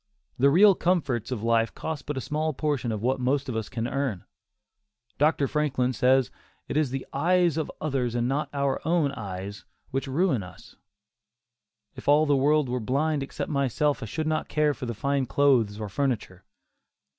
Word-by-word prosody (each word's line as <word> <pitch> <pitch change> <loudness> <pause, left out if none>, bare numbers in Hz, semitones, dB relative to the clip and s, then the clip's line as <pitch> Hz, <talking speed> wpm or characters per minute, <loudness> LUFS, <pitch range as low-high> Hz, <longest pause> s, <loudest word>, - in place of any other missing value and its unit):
The 140 +2 +5
real 195 +7 +7
comforts 145 - 0
of 120 -5 -4
life 115 0 +1
cost 160 -2 -5
but 150 -2 -3
a - - -2
small 155 +4 -1
portion 140 -5 -1
of 110 -1 -4
what 130 +2 +1
most 135 +3 0
of 125 - -3
us 110 -1 -3
can 120 -2 -3
earn. 130 -8 -2 0.9
Dr. 150 -1 +3
Franklin 140 -4 0
says 130 0 +3 0.4
"it - - -4
is 150 -3 +2
the 135 +1 -4
eyes 175 +2 +2
of 160 -1 -2
others 130 -6 -1
and 120 0 +1
not 140 +4 -1
our 140 -1 -1
own 160 -3 +2
eyes 100 -4 -7 0.3
which 135 +1 -2
ruin 135 - +1
us. 90 -1 -13 1.2
If - - -11
all 150 +2 +5
the 145 -1 +3
world 145 +1 +3
were 125 +1 -2
blind 140 +6 0
except 135 - -5
myself 140 +1 0
I 115 - -5
should 155 +8 -3
not 155 0 -1
care 150 -1 +2
for 130 -4 -5
fine 135 +4 -1
clothes 120 -7 +2
or 105 - -4
furniture." 105 -6 -2
135 Hz, 180 wpm, -26 LUFS, 120-150 Hz, 1.2 s, real